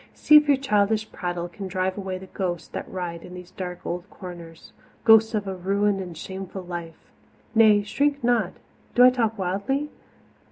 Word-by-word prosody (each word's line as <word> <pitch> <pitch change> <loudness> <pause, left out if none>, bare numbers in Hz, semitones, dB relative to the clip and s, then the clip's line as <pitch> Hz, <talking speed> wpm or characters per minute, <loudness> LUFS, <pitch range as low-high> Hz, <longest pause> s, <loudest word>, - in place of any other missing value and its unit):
See 305 - +5
if 300 0 +4
your 285 -2 +5
childish 215 -4 +1
prattle 175 -1 -3
can 190 +3 -7
drive 185 0 -1
away 190 -2 -4
the 190 - -10
ghosts 180 -2 -4
that - - -6
riot 175 -2 -5
in 180 - -10
these 180 0 -11
dark 180 -1 -7
old 175 +3 -4
corners 170 -5 -11 0.3
ghosts 220 0 +6
of 205 -2 -2
a 190 - -2
ruined 195 +2 0
and 175 -3 -8
shamed 190 +3 -7
life! 175 -3 -7 0.4
Nay, 215 -2 +5
shrink 285 +6 0
not 240 -1 +2 0.4
do 245 - +7
I 250 - +9
talk 225 -3 0
wildly? 200 +11 -2
195 Hz, 175 wpm, -24 LUFS, 180-220 Hz, 0.4 s, I